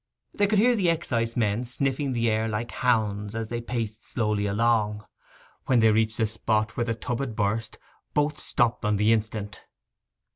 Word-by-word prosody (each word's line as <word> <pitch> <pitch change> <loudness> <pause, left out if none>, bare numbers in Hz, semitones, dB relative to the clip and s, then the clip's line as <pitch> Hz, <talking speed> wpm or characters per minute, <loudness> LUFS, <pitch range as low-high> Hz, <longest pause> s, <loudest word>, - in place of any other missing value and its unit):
They 205 - +2
could 210 +1 +2
hear 240 +4 +5
the 195 -5 +1
excisemen 115 -8 0
sniffing 135 +2 -1
the 115 -1 +1
air 110 0 +1
like 110 +2 -3
hounds 105 -4 0
as 115 -1 -3
they 120 0 -3
paced 115 -3 -4
slowly 105 -3 -1
along. 105 0 +1 0.6
When 125 -2 +4
they 110 -1 +5
reached 110 0 +1
the 110 - +2
spot 110 0 -1
where 120 - 0
the 115 -1 -1
tub 115 +2 -3
had 130 -5 -3
burst, 110 +2 -1 0.4
both 150 +1 +1
stopped 120 -5 0
on 105 -1 +1
the 105 +3 +4
instant. 110 -2 -3
115 Hz, 175 wpm, -26 LUFS, 105-125 Hz, 0.6 s, hear